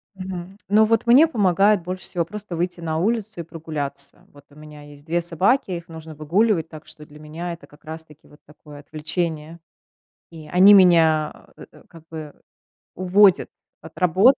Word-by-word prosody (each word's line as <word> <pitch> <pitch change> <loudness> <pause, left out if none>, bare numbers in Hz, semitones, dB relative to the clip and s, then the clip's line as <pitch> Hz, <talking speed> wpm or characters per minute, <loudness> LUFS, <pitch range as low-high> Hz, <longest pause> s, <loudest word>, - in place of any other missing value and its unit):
Мгм. 185 0 -8
Но 215 +2 +4
вот 225 +1 0
мне 270 +7 +7
помогает 200 - +2
больше 185 +1 -6
всего 170 -2 -3
просто 205 0 -8
выйти 175 +1 -3
на 160 -1 -3
улицу 215 +1 -2
и - - -7
прогуляться. 150 -4 -6
Вот 145 0 -18
у 145 - -21
меня 150 -1 -13
есть 145 0 -15
2 170 +1 -1
собаки, 185 - +1
их 170 -1 -6
нужно 160 -1 -11
выгуливать, 165 +3 +1
так 155 -2 -12
что 150 - -12
для 150 0 -16
меня 165 +3 -6
это 170 - -13
как 145 +2 -22
раз 160 +1 -6
таки 150 -1 -21
вот 150 - -20
такое 150 0 -15
отвлечение. 155 +2 -4 0.7
И 160 -2 -12
они 195 +3 +7
меня, 165 -5 +3
э, - - -12 0.2
как 165 - -15
бы 155 -2 -8 0.6
уводят 185 +1 +3 0.3
от 160 +1 -14
работы 190 +10 +4
170 Hz, 175 wpm, -22 LUFS, 155-190 Hz, 0.7 s, мне